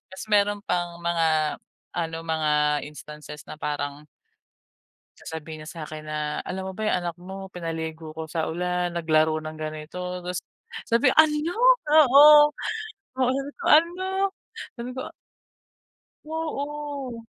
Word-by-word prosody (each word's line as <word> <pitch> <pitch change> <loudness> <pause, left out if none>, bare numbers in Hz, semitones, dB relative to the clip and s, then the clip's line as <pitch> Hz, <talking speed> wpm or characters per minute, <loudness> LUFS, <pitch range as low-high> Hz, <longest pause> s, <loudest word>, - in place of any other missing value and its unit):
Ta’s 190 - -7
meron 205 0 +3
pang 175 -1 -2
mga 165 -3 +1 0.4
ano, 165 -1 -2
mga 150 -2 +1
instances 150 0 -10
na - - -6
parang 145 0 -3 1.2
sasabihin 160 -1 -7
niya 155 - -8
sa’kin 155 -2 -7
na, 150 0 -2
"Alam 190 0 -5
mo - - -7
ba 220 - -6
yung - - +2
anak 175 -1 -4
mo 190 +1 -7
pinaligo 160 -2 -5
ko 160 +1 -6
sa 160 0 -2
ulan, 180 +1 -1
naglaro 160 -2 +2
ng 155 0 -7
ganito." 155 +2 -6 0.3
Ta’s 180 0 -3 0.5
sabi 235 +4 +3
"Ano?" 315 +2 +4 0.3
Oo. 295 0 +8 0.7
Oo, 255 -1 +3
sabi 275 +1 -4
ko, - - -6
"Ano?" 340 +4 +4 0.7
sabi 240 0 -6
ko - - -4 1.2
Oo. 290 -5 -4
170 Hz, 130 wpm, -25 LUFS, 155-250 Hz, 1.2 s, Oo